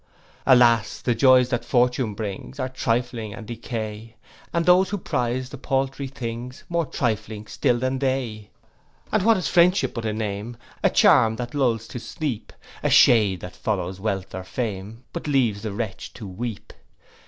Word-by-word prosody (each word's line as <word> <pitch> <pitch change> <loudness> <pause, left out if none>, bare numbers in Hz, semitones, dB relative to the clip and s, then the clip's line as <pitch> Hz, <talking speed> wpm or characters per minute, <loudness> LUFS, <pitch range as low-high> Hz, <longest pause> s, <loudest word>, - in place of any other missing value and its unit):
'Alas! 120 -5 +5
the 120 - +1
joys 130 0 +5
that 120 -2 -1
fortune 125 -3 +1
brings, 105 +5 -6
Are 130 - 0
trifling 120 -3 -2
and 115 - -9
decay; 110 -1 -6 0.4
And 170 -1 0
those 180 +1 +5
who 205 - -2
prize 125 -6 -2
the 140 - -8
paltry 135 0 -1
things, 125 -1 -6
More 170 -3 0
trifling 110 -3 -2
still 120 +3 +1
than 130 +2 -1
they. 125 -6 -2 0.6
'And 215 - +2
what 225 +2 +4
is 185 - -1
friendship 180 +3 +4
but 115 -1 -4
a - - 0
name, 105 +2 -4 0.2
A - - +4
charm 135 - +5
that 120 +1 -5
lulls 120 -6 +1
to 120 - -6
sleep; 120 +1 -4 0.3
A - - +1
shade 105 -6 +5
that 90 - -8
follows 95 -3 -2
wealth 95 -2 -3
or 95 - -5
fame, 110 +1 -5
But - - -5
leaves 120 -8 +2
the 110 -1 -4
wretch 105 -1 -5
to 110 - -9
weep? 105 +3 -6
120 Hz, 165 wpm, -24 LUFS, 110-130 Hz, 0.6 s, Alas